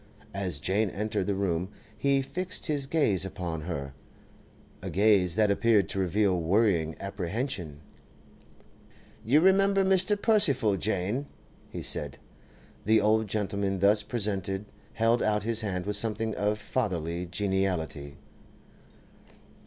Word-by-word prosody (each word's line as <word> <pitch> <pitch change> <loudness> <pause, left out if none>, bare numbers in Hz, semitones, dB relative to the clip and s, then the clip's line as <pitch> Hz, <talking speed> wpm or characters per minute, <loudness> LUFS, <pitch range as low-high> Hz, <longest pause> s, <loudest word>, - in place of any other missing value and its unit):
As 95 -7 -2
Jane 100 +5 +1
entered 105 0 -3
the 100 - 0
room 95 -2 -1 0.3
he 140 -1 +1
fixed 180 +6 -3
his 145 -3 0
gaze 110 - +1
upon 90 -4 -5
her—a 70 -5 -10
gaze 100 -4 +3
that 105 -2 +3
appeared 105 -3 +3
to 95 - -2
reveal 95 0 +1
worrying 85 -3 +1
apprehension. 100 - -4 1.4
'You 135 +7 +4
remember 195 +1 +4
Mr. 190 +2 +3
Percival, 165 - +3
Jane,' 105 +7 -2 0.4
he - - -7
said. - - -1 0.7
The 110 +2 +4
old 110 +1 +2
gentleman 100 -1 -1
thus 100 +3 +4
presented 100 -3 -2 0.3
held 115 +1 +2
out 105 -1 +1
his 115 0 +1
hand 90 -4 -3
with 105 0 0
something 110 0 0
of 105 +1 -1
fatherly 90 -7 -3
geniality. 90 -6 -2
100 Hz, 120 wpm, -28 LUFS, 90-115 Hz, 1.4 s, You